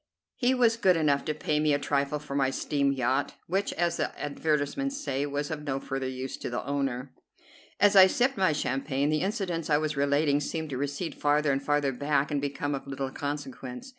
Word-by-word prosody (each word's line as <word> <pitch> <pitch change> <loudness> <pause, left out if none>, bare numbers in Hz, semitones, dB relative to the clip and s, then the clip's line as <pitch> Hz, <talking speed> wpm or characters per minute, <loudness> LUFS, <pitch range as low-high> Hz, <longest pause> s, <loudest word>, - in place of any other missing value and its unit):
He 255 0 +2
was 235 -2 +3
good 185 -6 +4
enough 145 -3 +2
to 155 - -1
pay 150 0 0
me 150 -1 +3
a - - +3
trifle 140 0 0
for 150 -1 -8
my 135 -1 +2
steam 140 +1 0
yacht, 130 +1 0
which, 195 +3 0
as 170 0 0
the - - -3
advertisements 150 - -1
say, 145 - -2
was 145 +1 -3
'of 155 -2 -3
no 135 -2 -2
further 135 -1 -3
use 130 0 -5
to - - -5
the 120 0 -3
owner.'" 135 -2 -2 0.7
As 205 0 +5
I 190 -1 +10
sipped 250 +7 +1
my 190 -6 +3
champagne, 140 0 -1
the 155 - +1
incidents 185 -5 -2
I 150 - +4
was 155 0 -1
relating 145 +1 +2
seemed 160 +1 -4
to 130 - -2
recede 145 +5 -3
farther 150 0 +2
and 135 0 0
farther 145 -1 +1
back 145 +2 0
and 145 -1 0
become 145 0 -2
of 140 0 -5
little 135 -1 -4
consequence. 140 - -5
145 Hz, 205 wpm, -28 LUFS, 140-160 Hz, 0.7 s, I